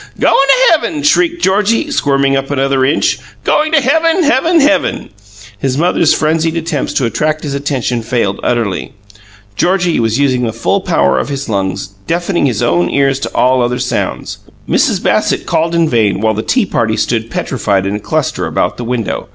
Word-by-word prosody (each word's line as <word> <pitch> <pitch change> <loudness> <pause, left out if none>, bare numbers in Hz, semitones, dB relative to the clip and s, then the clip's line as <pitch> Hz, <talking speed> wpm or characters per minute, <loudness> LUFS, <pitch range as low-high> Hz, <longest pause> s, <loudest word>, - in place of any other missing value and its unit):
"Going - - +3
to 375 - +4
heaven!" 315 -2 0
shrieked 340 +3 +2
Georgie, 210 +9 +1
squirming 140 - +1
up 135 0 -2
another 135 -1 0
inch. 140 +4 +1 0.2
"Going 310 +1 +1
to 315 - +6
heaven, 325 +6 +2
heaven, 325 +4 +3
heaven!" 290 0 +1 0.5
His 135 +2 -1
mother's 170 0 +2
frenzied 160 +1 0
attempts 160 -4 -2
to 130 - 0
attract 155 +6 -1
his 145 -3 -4
attention 135 -4 -2
failed 115 -4 -1
utterly. 115 -6 -2 0.6
Georgie 180 - +1
was 115 0 0
using 135 -3 +1
the 115 -2 -2
full 155 - 0
power 180 -3 +1
of - - -3
his 140 -1 -4
lungs, 95 -3 -2 0.2
deafening 175 -2 0
his 115 -6 -1
own 85 0 +1
ears 135 -1 +1
to - - -5
all 130 0 +3
other 120 0 0
sounds. 125 -2 -3 0.3
Mrs. - - +1
Bassett - - 0
called 165 +1 0
in 165 -1 +2
vain; 110 -8 +1
while 110 +1 +1
the 110 - -2
tea 250 - +1
party 115 - -1
stood 115 -1 -1
petrified 100 -8 -1
in 100 +1 -2
a - - -3
cluster - - -2
about - - -1
the 120 - -5
window. 115 -2 -3
140 Hz, 180 wpm, -13 LUFS, 120-190 Hz, 0.6 s, to